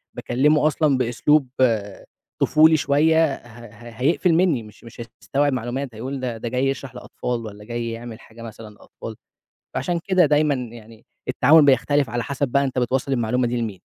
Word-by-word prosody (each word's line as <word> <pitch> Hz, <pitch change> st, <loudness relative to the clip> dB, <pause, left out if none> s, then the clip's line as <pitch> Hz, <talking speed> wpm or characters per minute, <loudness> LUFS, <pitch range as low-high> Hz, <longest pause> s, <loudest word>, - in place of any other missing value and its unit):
باكلمه 150 Hz, +5 st, +2 dB
أصلًا 150 Hz, -3 st, +1 dB
بأسلوب 130 Hz, +4 st, +2 dB, 0.9 s
طفولي 155 Hz, +1 st, +5 dB
شوية 150 Hz, +2 st, +2 dB
ه 120 Hz, 0 st, -14 dB
ه 115 Hz, +3 st, -13 dB
هيقفل 165 Hz, +5 st, +2 dB
مني، 165 Hz, -9 st, +2 dB
مش 105 Hz, +1 st, -16 dB
مش 115 Hz, 0 st, -11 dB, 0.2 s
هيستوعب 145 Hz, 0 st, 0 dB
معلومات 125 Hz, 0 st, -4 dB
هيقول 130 Hz, +4 st, -5 dB
ده 120 Hz, -3 st, -4 dB
ده 115 Hz, +1 st, -5 dB
جاي 130 Hz, +2 st, 0 dB
يشرح 135 Hz, -2 st, -4 dB
لأطفال، 120 Hz, -1 st, -5 dB
والّا 105 Hz, 0 st, -10 dB
جاي 120 Hz, 0 st, -4 dB
يعمل 115 Hz, -1 st, -8 dB
حاجة 115 Hz, +1 st, -15 dB
مثلًا 110 Hz, -1 st, -10 dB
للأطفال، 110 Hz, +1 st, -11 dB, 0.6 s
فعشان 175 Hz, -1 st, -1 dB
كده 185 Hz, -3 st, +4 dB
دايمًا 150 Hz, 0 st, +2 dB
يعني 115 Hz, -2 st, -10 dB, 0.2 s
التعامل 150 Hz, +4 st, +5 dB
بيختلف 140 Hz, 0 st, +2 dB
على 120 Hz, 0 st, -2 dB
حسب 140 Hz, 0 st, -2 dB
بقى 140 Hz, +3 st, +1 dB
أنت 130 Hz, -1 st, -2 dB
بتوصّل 130 Hz, +2 st, -1 dB
المعلومة 120 Hz, +1 st, 0 dB
دي 120 Hz, +1 st, -2 dB
لمين؟ 105 Hz, -5 st, -5 dB
125 Hz, 170 wpm, -22 LUFS, 115-145 Hz, 0.9 s, طفولي